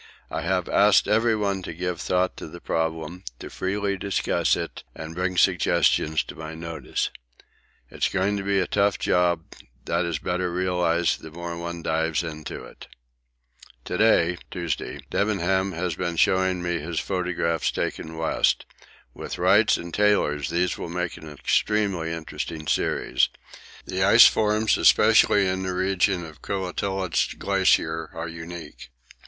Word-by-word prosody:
I - - -2
have 90 0 0
asked 105 0 +4
everyone 105 -2 +1
to 85 - -7
give 90 0 -3
thought 90 0 0
to - - -7
the 85 +3 -10
problem, 80 +2 -3
to - - -9
freely 100 +1 -2
discuss 100 +1 +1
it, - - -5
and 80 +1 -7
bring 90 +1 -2
suggestions 80 -2 +3
to - - -10
my 80 0 -7
notice. 80 -4 -3 0.8
It's - - 0
going 100 +2 0
to 100 - -4
be 100 0 +1
a - - +1
tough 100 0 +1
job; 85 -2 +1 0.4
that 85 +1 0
is 85 -3 -2
better 90 +3 -2
realised 90 -1 +1
the 80 - -9
more 85 +1 -6
one 85 0 -6
dives 80 +1 0
into 75 -2 -7
it. - - -13 1.0
To - - -3
day 90 -6 +3
(Tuesday) 85 -2 -4
Debenham 95 -2 +1
has 85 +1 -2
been 85 +1 -3
showing 95 0 +2
me 85 -1 -1
his 80 +2 -3
photographs 90 -3 -1
taken 80 0 -4
west. 80 - +1 0.5
With - - -6
Wright's 100 +5 +4
and 85 -1 -8
Taylor's 90 -9 +2
these 85 +1 0
will - - -5
make 90 0 -3
an 80 -2 -10
extremely 95 +3 0
interesting 80 -1 -5
series - - +1 0.6
the - - -3
ice - - +8
forms 110 0 +3
especially 100 -2 +5
in 95 0 -1
the 95 -1 -3
region 95 -1 +1
of 80 -2 -13
the - - -14
Koettlitz 95 -1 -1
glacier 80 0 +1
are 80 0 -4
unique. 80 -1 -9
90 Hz, 150 wpm, -25 LUFS, 80-95 Hz, 1.0 s, ice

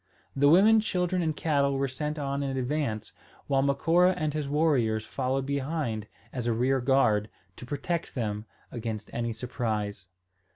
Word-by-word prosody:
The 145 +1 +5
women, 210 +7 +7
children, 180 -4 0
and 155 -3 -1
cattle 140 -3 +1
were 135 0 +1
sent 150 +4 -4
on 140 -1 -2
in 135 -1 -2
advance, 125 -5 -2 0.3
while 135 -1 +2
Macora 165 +7 +3
and 155 -4 -1
his 150 -2 -2
warriors 130 -8 +2
followed 135 0 -1
behind 140 -6 -2 0.3
as 125 -2 -3
a 120 - +2
rear 130 +3 +1
guard, 115 -5 +3 0.3
to 125 - -9
protect 165 +4 -3
them 105 -3 -2 0.3
against 110 -3 -5
any 120 0 -1
surprise. 110 -5 -3
135 Hz, 155 wpm, -28 LUFS, 115-150 Hz, 0.3 s, women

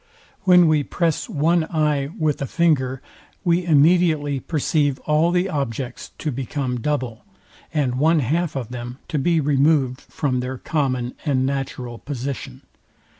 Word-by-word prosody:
When 180 -2 +7
we 155 -1 +3
press 165 +2 -1
one 160 +3 +2
eye 150 -4 0
with 155 -5 0
a 140 - -1
finger, 135 -6 +1 0.4
we 175 0 +2
immediately 155 -2 +3
perceive 145 -2 0
all 155 +2 +2
the 180 +2 +1
objects 135 - -4
to 155 - -2
become 130 0 -3
double, 130 -4 -2 0.5
and 130 -5 0
one 160 +1 +4
half 155 +6 0
of 125 -5 -4
them 120 0 -6
to 155 - 0
be 165 +3 +2
removed 140 -2 +2
from 130 -4 -2
their 130 +1 -4
common 130 -4 -1
and 130 -4 +1
natural 130 -3 -4
position. 135 -1 -6
145 Hz, 140 wpm, -22 LUFS, 130-160 Hz, 0.5 s, When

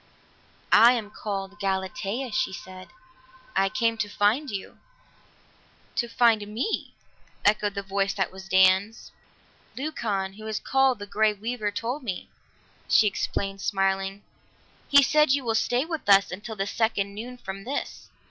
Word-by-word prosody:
"I 235 +3 +8
am 220 -4 -4
called 200 -1 -5
Galatea," 195 +5 -2
she 255 +1 0
said. 185 0 -10 0.7
"I 195 - +3
came 230 +1 0
to 205 - -1
find 215 +8 +1
you." 195 -2 -6 1.2
"To 240 - +1
find 230 -3 +3
me?" 230 - -3 0.5
echoed 205 0 +2
the 200 - -3
voice 195 0 0
that 190 -2 -1
was 190 0 -11
Dan's. 190 +3 +3 0.7
"Leucon, 210 -9 -3
who 215 0 -8
is 215 -1 -2
called 265 -2 +2
the 205 - -7
Grey 215 +1 +2
Weaver, 215 +1 -3
told 230 +7 -3
me," 200 -8 -5 0.6
she 220 - +5
explained 195 -1 -2
smiling. 195 0 -1 0.7
"He 280 0 +7
said 300 0 +4
you 280 -1 0
will 230 -2 0
stay 245 +4 +1
with 320 -9 -5
us 200 0 +6
until 210 +4 -6
the 195 -1 -2
second 205 -2 -1
noon 240 +4 -7
from 195 -4 -7
this." 265 +6 -5
210 Hz, 145 wpm, -26 LUFS, 195-235 Hz, 1.2 s, I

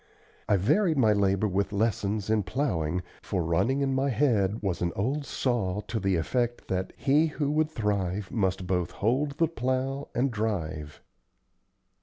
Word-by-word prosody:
I 100 - +5
varied 155 - +2
my 110 -5 +5
labor 100 0 +2
with 100 0 0
lessons 105 0 0
in 110 -1 +3
plowing, 90 - -1 0.2
for 95 -4 -2
running 95 +12 +1
in 135 -1 +1
my 135 +1 +1
head 110 -6 +1
was 95 -4 -1
an 85 -1 +1
"old 135 +8 -1
saw" 105 -6 -1
to 110 +1 -3
the 95 -1 +1
effect 120 +8 -1
that 95 0 -1
"he 150 +4 +3
who 145 -2 -1
would 155 +1 +2
thrive 100 - -1
must 95 -4 0
both 90 -1 0
hold 135 +7 0
the 165 - +3
plow 130 -1 -2
and 130 +2 +1
drive." 80 -9 -3
105 Hz, 160 wpm, -28 LUFS, 95-135 Hz, 0.2 s, I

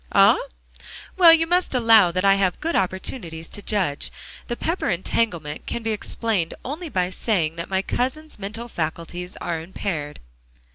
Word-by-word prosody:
"Ah? - - +6 0.8
Well, 350 -3 +8
you 325 0 +5
must 350 -3 +1
allow 225 -7 +6
that 185 +3 -1
I 195 - +7
have 195 -2 +1
good 330 +2 -2
opportunities 185 -3 -2
to 205 - -7
judge. 190 -10 -1 0.4
The 240 - -2
Pepper 335 +3 -1
entanglement 175 -4 -1
can 235 - -3
be 225 - 0
explained 210 -4 -1
only 310 +6 -5
by 180 -6 0
saying 175 -6 0
that 170 - -5
my 190 0 0
cousin's 300 +5 -2
mental 210 +4 -5
faculties 175 -1 -5
are 165 -2 -2
impaired." 165 -4 -4
195 Hz, 155 wpm, -23 LUFS, 170-240 Hz, 0.8 s, Well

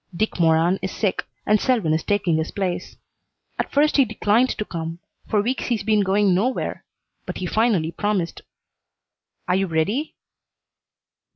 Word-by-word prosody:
Dick 215 +1 -1
Moran 165 +3 +3
is 190 - -2
sick, 200 -4 -1 0.2
and 210 0 +3
Selwyn 225 -12 +2
is 160 - +1
taking 190 -5 +1
his 160 0 -1
place. 185 -3 -3 0.6
At - - -2
first 300 +2 +3
he 275 - +7
declined 220 +3 +2
to 210 - -2
come. 165 -2 -5 0.3
For 210 -1 +2
weeks 255 +4 -1
he's 235 -4 0
been 215 0 +2
going 195 0 +3
nowhere, 230 +9 -1 0.4
but - - -4
he 185 - -4
finally 195 -5 +1
promised. 195 -4 -2 1.1
Are 180 - +2
you 195 0 +1
ready?" 195 - -1
200 Hz, 155 wpm, -22 LUFS, 170-220 Hz, 1.1 s, he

